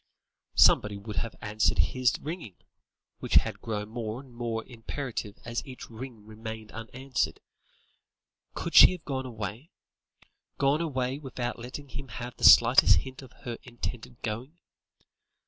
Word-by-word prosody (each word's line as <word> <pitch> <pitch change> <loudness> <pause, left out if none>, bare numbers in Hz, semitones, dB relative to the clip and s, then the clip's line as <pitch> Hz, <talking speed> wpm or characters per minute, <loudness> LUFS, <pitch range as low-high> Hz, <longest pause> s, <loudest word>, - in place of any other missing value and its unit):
Somebody 105 -1 +5
would 105 +1 -7
have 115 - -2
answered 105 +1 +1
his 130 -1 +2
ringing, 155 - -6 0.6
which - - -2
had - - +3
grown 105 -2 -3
more 115 0 -4
and 130 -2 -14
more 115 -1 -3
imperative 115 -3 -5
as 120 +1 -3
each 130 -3 -10
ring 115 -2 -9
remained 110 0 -8
unanswered. 125 +4 -3 1.2
Could - - -4
she - - +10
have 180 -3 -10
gone 130 -2 -3
away? 110 - -6 0.9
Gone 140 +3 +2
away 130 -4 -1
without 125 -4 -4
letting 130 +4 -8
him 135 +2 -7
have 120 +1 -7
the - - -11
slightest 120 +3 +8
hint 130 0 -9
of 130 - -13
her 120 -2 -5
intended 120 0 -7
going? 125 +8 -4
120 Hz, 140 wpm, -28 LUFS, 110-130 Hz, 1.2 s, she